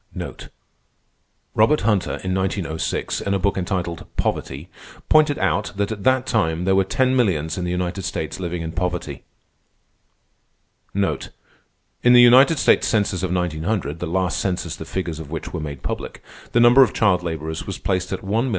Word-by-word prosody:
Robert 110 +8 +3
Hunter, 105 -3 +1
in 95 0 -1
1906, 95 -4 -2
in 100 - -1
a - - 0
book 100 +1 +1
entitled 90 -2 -3
"Poverty," 70 +6 -2 0.4
pointed 155 -2 +4
out 95 +1 0
that 100 +1 -1
at 105 -3 -5
that 130 0 +3
time 85 -5 0
there 95 - +3
were 95 - +4
ten 130 +7 +1
millions 80 - +1
in 90 - -3
the - - -2
United 90 +1 -2
States 85 -2 -4
living 85 -2 -3
in 80 - -4
poverty. 90 0 -3 1.7
In 100 +4 -2
the 125 - +8
United 130 +6 +7
States - - +3
Census 105 -5 0
of 95 -2 -2
1900 85 -2 -2
(the - - -3
last 90 -1 0
census 90 -4 -2
the 80 - -8
figures 85 -3 -4
of 80 -3 -8
which 80 - -6
were 85 - -3
made 75 -3 -7
public), - - -5 0.3
the 120 - +3
number 120 +3 +7
of 125 - +4
child 95 -5 +2
laborers 80 -2 -5
was - - -4
placed 95 -1 -2
at - - -3
1,752,187. 110 +6 0
95 Hz, 170 wpm, -21 LUFS, 85-105 Hz, 1.7 s, the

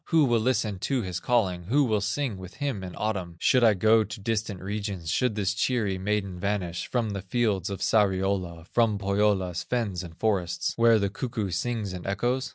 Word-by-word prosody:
Who 160 -3 +4
will 120 -3 +3
listen 110 -4 0
to 130 +4 0
his 90 -2 -3
calling, 95 -7 +1
Who 140 +9 +3
will 110 -5 +1
sing 105 +1 -2
with 95 -1 -10
him 135 -8 -3
in 90 -1 -7
autumn, 95 -6 -2
Should 125 +7 +3
I 110 -3 +6
go 110 +3 +4
to 105 0 -8
distant 105 -2 -2
regions, 100 -3 -4
Should 125 -4 +1
this 100 -2 0
cheery 105 -3 0
maiden 100 -2 -2
vanish 90 -4 -2
From 115 -4 -1
the 100 -1 -4
fields 100 -2 0
of 100 - -5
Sariola, 95 -5 +1
From 110 +2 +2
Pohyola's 100 -3 +1
fens 110 -8 -2
and 85 -3 -10
forests, 95 -6 0
Where 115 -1 +5
the 100 -2 0
cuckoo 110 -5 -3
sings 105 +2 -2
and 90 0 -7
echoes? 125 +7 0
105 Hz, 190 wpm, -27 LUFS, 95-115 Hz, -, I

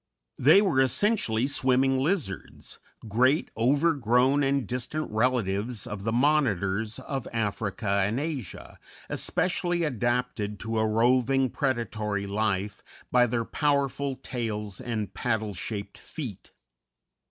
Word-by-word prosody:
They 160 +10 +6
were 160 -10 +3
essentially 130 - +2
swimming 130 -1 +2
lizards 140 - -3 0.3
great, 130 +8 +2
overgrown, 135 0 +3
and 140 -1 +1
distant 125 +4 -3
relatives 110 -2 0
of 100 -1 -6
the 115 - +1
Monitors 110 - +1
of 135 -3 -5
Africa 105 -2 -1
and 110 +6 0
Asia, 145 - -6 0.3
especially 175 -1 0
adapted 120 -6 -1
to 110 0 -2
a 110 - +2
roving, 125 +4 +2
predatory 110 -7 -2
life 100 -1 -1 0.3
by 125 -1 +5
their 115 0 -1
powerful 140 -1 0
tails 110 -5 -4
and 115 -5 -3
paddle 110 -3 -1
shaped 100 +1 -6
feet. 125 - -8
120 Hz, 110 wpm, -27 LUFS, 105-135 Hz, 0.3 s, They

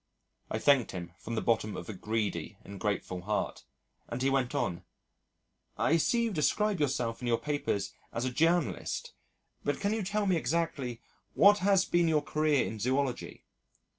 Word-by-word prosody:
I - - -1
thanked 140 -5 +3
him 85 -2 -6
from 115 - -5
the - - -1
bottom 110 -2 +1
of - - -7
a 110 - -5
greedy 105 +2 -2
and 100 -1 -9
grateful 95 -2 -2
heart, 105 +3 -2 0.4
and 120 - -3
he 135 +1 +2
went 135 0 0
on, 110 -11 -1 0.9
"I 165 - +3
see 235 +8 +2
you 230 - 0
describe 200 +5 +1
yourself 125 -5 0
in 125 - -3
your 115 -1 +3
papers 145 -9 -2 0.2
as 120 - -2
a 130 - -1
journalist, 165 +4 0 0.5
but 145 - -1
can 200 +1 0
you 220 - -1
tell 210 +2 -1
me 185 -3 +3
exactly 140 -5 -2 0.3
what 205 +1 +7
has 195 -1 +4
been 175 -1 +2
your 155 -2 +2
career 150 -2 +2
in 110 - -5
Zoology?" 130 +2 -1
135 Hz, 170 wpm, -30 LUFS, 115-170 Hz, 0.9 s, what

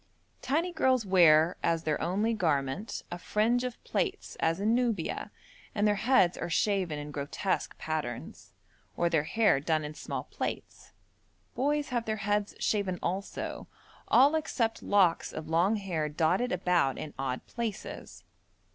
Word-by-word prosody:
Tiny 335 +6 0
girls 255 -7 +2
wear, 170 -3 +5
as 165 -1 +1
their 155 -2 -1
only 210 +6 +1
garment, 160 +1 -1
a 175 - -5
fringe 230 +6 +1
of 250 -1 -4
plaits - - -2
as 165 +2 +1
in 215 +3 +2
Nubia, 235 -8 -1 0.5
and 210 0 +2
their 210 - +4
heads 195 -4 +3
are - - -3
shaven 185 -4 +1
in 150 0 -6
grotesque 145 +7 -2
patterns, 150 -7 -5 0.4
or 170 0 +1
their 155 -3 +2
hair 215 -5 +3
done 155 +2 0
in 150 - -6
small - - -5
plaits. - - -6 0.6
Boys 290 +2 0
have 240 -2 -1
their 220 - -1
heads 205 0 0
shaven 200 -4 0
also, 190 +3 -4 0.4
all 275 +4 +6
except 255 -8 -1
locks 190 -5 +2
of 155 - -6
long 175 +6 +3
hair 175 -7 -2
dotted 175 +10 +1
about 180 -7 +1
in 150 - -6
odd 130 -2 -3
places. 230 -3 -6
190 Hz, 145 wpm, -29 LUFS, 160-225 Hz, 0.6 s, all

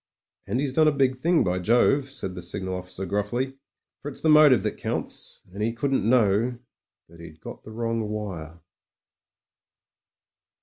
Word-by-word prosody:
"And 125 - -1
he's 140 -2 -1
done 155 +2 +5
a - - +5
big 135 -2 +2
thing, 165 +5 +2
by 90 -2 0
Jove," 125 +7 +3
said 95 -8 -5
the 90 - -7
signal 95 +2 -4
officer 90 +1 -5
gruffly, 120 +8 -2 0.4
"for 145 - -5
it's 140 - -6
the 160 - +3
motive 150 -4 +7
that - - -2
counts. - - -4
And 100 - -6
he 115 +2 0
couldn't 125 -2 0
know 115 0 +3 0.5
that 85 0 -17
he'd 80 -1 -12
got - - -10
the 110 - -11
wrong 115 -1 -2
wire." 90 -6 -6
115 Hz, 165 wpm, -25 LUFS, 95-135 Hz, 0.5 s, motive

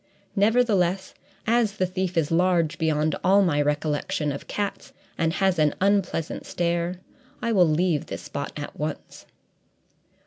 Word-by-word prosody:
Nevertheless, 200 -4 +2 0.3
as 230 -2 +2
the 190 -3 0
thief 185 0 -3
is 160 -2 +1
large 170 -2 +2
beyond 155 -1 +1
all 200 +2 +5
my 145 -5 +2
recollection 150 0 -1
of 140 - -7
cats 205 -1 -4 0.2
and 165 -1 +1
has 190 -3 +1
an 150 -1 +3
unpleasant 195 -5 0
stare, 170 +1 -1 0.4
I 235 - -1
will 180 -6 +4
leave 160 -1 +1
this - - -6
spot 140 0 -5
at 145 - -6
once." 150 0 -5
175 Hz, 140 wpm, -25 LUFS, 155-195 Hz, 0.4 s, all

